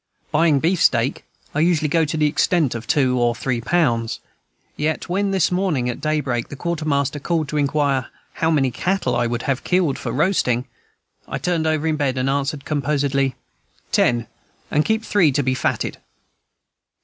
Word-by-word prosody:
Buying 150 -2 +3
beefsteak, 140 -7 +2 0.3
I 150 - -1
usually 160 -1 +2
go 160 +2 +2
to 155 +1 -3
the 155 - +2
extent 155 -1 +2
of 115 -1 -6
two 130 -3 +2
or 120 -1 +2
three 120 0 -2
pounds. 115 -7 +1 0.6
Yet 155 +1 -2
when, 200 +3 0
this 190 -3 +2
morning 180 -9 0
at 125 - -4
daybreak, 145 -6 -1
the - - -7
quartermaster 145 -2 -1
called 160 +1 -1
to 150 - -2
inquire 140 -2 +1 0.3
how 160 - 0
many 135 -5 +2
cattle 190 +10 -1
I 120 0 +1
would 120 +1 -3
have 135 -2 -1
killed 180 -7 +1
for 115 - -4
roasting, 130 -4 +1 0.6
I - - -3
turned 170 -3 0
over 155 0 0
in 155 -1 +1
bed, 135 -3 0
and 130 +1 +1
answered 140 +1 -2
composedly, 140 -3 0 0.6
"Ten, 120 -1 +2 0.5
and 150 - +3
keep 220 0 0
three 180 -8 +3
to 140 - +1
be 130 0 +1
fatted." 130 - -2
145 Hz, 170 wpm, -21 LUFS, 130-160 Hz, 0.6 s, Buying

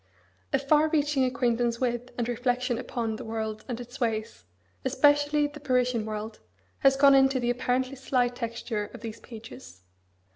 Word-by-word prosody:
A - - +3
far 300 +3 +3
reaching 295 -3 +2
acquaintance 240 -2 0
with, 245 -1 -1
and 240 -2 -1
reflection 245 0 0
upon, 230 -3 -3
the - - -7
world 220 -1 -4
and 245 -2 -4
its 245 +2 -9
ways, 220 - -2 0.4
especially 290 +1 +3
the 290 +1 -6
Parisian 250 -5 +1
world, 215 0 -5 0.4
has 270 -1 +5
gone 275 0 +6
into 270 -1 +4
the 240 0 +1
apparently 255 +2 -1
slight 250 -2 0
texture 230 -3 -4
of 240 - -10
these 225 -2 -7
pages. 220 - -12
245 Hz, 155 wpm, -27 LUFS, 230-270 Hz, 0.4 s, gone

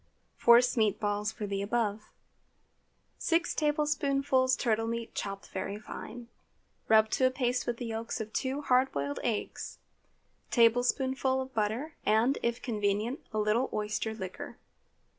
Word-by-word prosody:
Force 240 +2 +5
meat 215 -3 +2
balls 210 0 -1
for 215 - -5
the 200 -1 -2
above. 215 0 -1 1.1
Six 335 +1 +1
tablespoonfuls 285 -3 +1
turtle 225 -3 0
meat 230 0 -4
chopped 195 0 -5
very 195 +1 -4
fine. 230 +2 -8 0.6
Rub 220 0 +6
to 260 - +3
a - - +2
paste 250 -1 -1
with 240 -1 -1
the 245 - -5
yolks 225 +1 -4
of 220 0 -6
two 270 +2 -1
hard 260 0 +3
boiled 140 0 -3
eggs; 225 -3 -3 0.7
tablespoonful 260 +3 +2
of 260 0 -5
butter, 225 +9 -1
and, 225 +6 +3
if 235 0 -1
convenient, 215 +2 -1
a 215 - -3
little 215 +4 +1
oyster 215 +1 -2
liquor. 190 -4 -7
230 Hz, 140 wpm, -30 LUFS, 215-260 Hz, 1.1 s, Rub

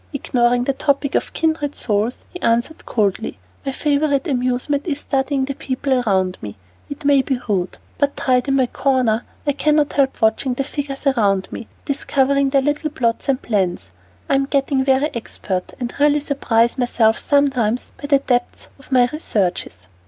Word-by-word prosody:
Ignoring 245 -3 +1
the 275 - 0
topic 280 0 0
of - - 0
"kindred 315 -3 -1
souls," 215 +2 -1
he 360 - -8
answered 235 +7 0
coldly, 205 - -1 0.3
"My 270 - -2
favorite 285 +2 +1
amusement 255 +3 -1
is 290 -3 -2
studying 270 0 0
the 275 - -3
people 265 0 -2
around 190 -7 +1
me. 105 -1 -7 0.3
It 285 +1 -8
may 280 -1 +5
be 260 -1 -2
rude, 185 -4 -1 0.2
but 285 -1 +1
tied 250 -1 +2
to 275 - -1
my 270 -1 +3
corner, 245 -3 +1 0.2
I 290 - +3
cannot 300 +1 +1
help 275 -2 +1
watching 225 +3 +1
the 275 - -1
figures 280 0 -5
around 205 -8 +2
me, - - -5
and - - -33
discovering 275 -1 +1
their 270 0 +2
little 295 +2 0
plots 235 -2 -1
and 265 -2 +2
plans. 185 - -1 0.4
I'm 275 0 +2
getting 275 -1 +1
very 270 +3 +2
expert, 190 -5 -4
and 245 -1 -4
really 295 0 +4
surprise 245 -4 +1
myself 230 -3 +2
sometimes 260 -5 +1
by 285 - -4
the 285 -1 +5
depth 245 -3 -2
of 270 - -18
my 250 -2 +5
researches." 185 - -2
265 Hz, 170 wpm, -20 LUFS, 235-280 Hz, 0.4 s, may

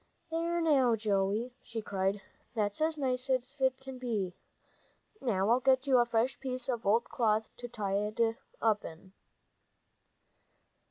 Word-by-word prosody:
"There 335 +1 0
now, 270 -7 +4
Joey," 210 +2 0
she 230 -1 -6
cried, 195 -1 -1 0.3
"that's 205 +3 -1
as 315 0 +1
nice 255 -2 -1
as 260 +2 -1 0.2
can 265 -1 -9
be! 215 -7 -2 0.9
Now 205 -4 +1
I'll 245 - +5
get 260 +1 +3
you 260 -3 +5
a 240 - +3
fresh 235 +3 +1
piece 255 -2 -4
of 240 -3 -1 0.2
cloth 220 -2 0
to 245 - -6
tie 205 -3 -1
it 215 - -9 0.4
up 220 -2 +2
in." 180 +4 -10
235 Hz, 140 wpm, -32 LUFS, 210-260 Hz, 0.9 s, I'll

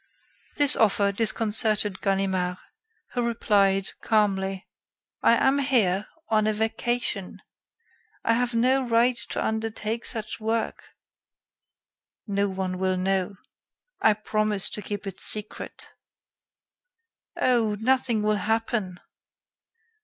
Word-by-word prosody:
This 290 -2 +7
offer 200 -2 +2
disconcerted 215 -1 +2
Ganimard, 190 -2 -1 0.5
who 245 - -2
replied, 200 -5 +1
calmly: 195 -3 0 0.5
"I 230 - +5
am 270 +3 +2
here 215 -8 +1 0.2
on 215 -1 +2
a 215 - +1
vacation. 220 -2 -2 0.8
I 230 - +2
have 240 0 0
no 255 +3 +3
right 240 +2 +3
to - - -2
undertake 220 +1 -3
such 220 -2 -3
work." 225 0 -3 1.4
"No 200 -1 -1
one 185 -1 -4
will 185 0 0
know. 190 +1 -1 0.7
I 220 - +5
promise 215 -2 +1
to 210 - -2
keep 205 +1 -6
it 195 -2 -7
secret." 210 0 -1 1.5
"Oh! 230 -4 +2
nothing 245 -2 +1
will 210 0 +1
happen." 215 -2 -2
215 Hz, 105 wpm, -25 LUFS, 195-230 Hz, 1.5 s, This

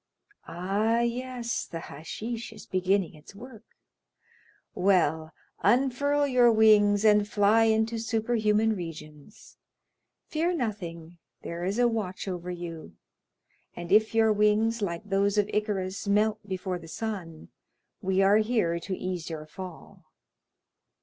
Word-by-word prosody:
"Ah, 205 +7 0
yes, 240 0 -2
the 165 - -6
hashish 220 +12 -6
is 215 -1 -12
beginning 185 0 0
its 155 +5 -15
work. 235 0 -12 1.1
Well, 160 -5 +1 0.3
unfurl 275 +6 +2
your 250 -3 +4
wings, 215 -1 +5
and 210 -1 +5
fly 210 +2 +4
into 220 +1 +1
superhuman 220 -1 +1
regions; 155 0 -10 0.7
fear 335 +3 -1
nothing, 175 - -5 0.2
there 170 +1 -5
is 195 +4 -1
a 245 0 +4
watch 210 -5 -3
over 180 -1 -5
you; 165 - -7 0.8
and 175 0 -7
if 215 +2 +4
your 220 -1 +4
wings, 210 +2 +2
like 170 -4 -3
those 200 0 0
of 205 -1 +3
Icarus, 200 -3 -2
melt 210 +1 +2
before 185 -1 -3
the 165 - -12
sun, 175 -5 -6 0.5
we 190 -1 +1
are 200 +2 +5
here 215 -7 +1
to 185 +2 -5
ease 180 -3 -4
your 155 -2 -6
fall." 180 +2 -11
205 Hz, 125 wpm, -27 LUFS, 180-225 Hz, 1.1 s, wings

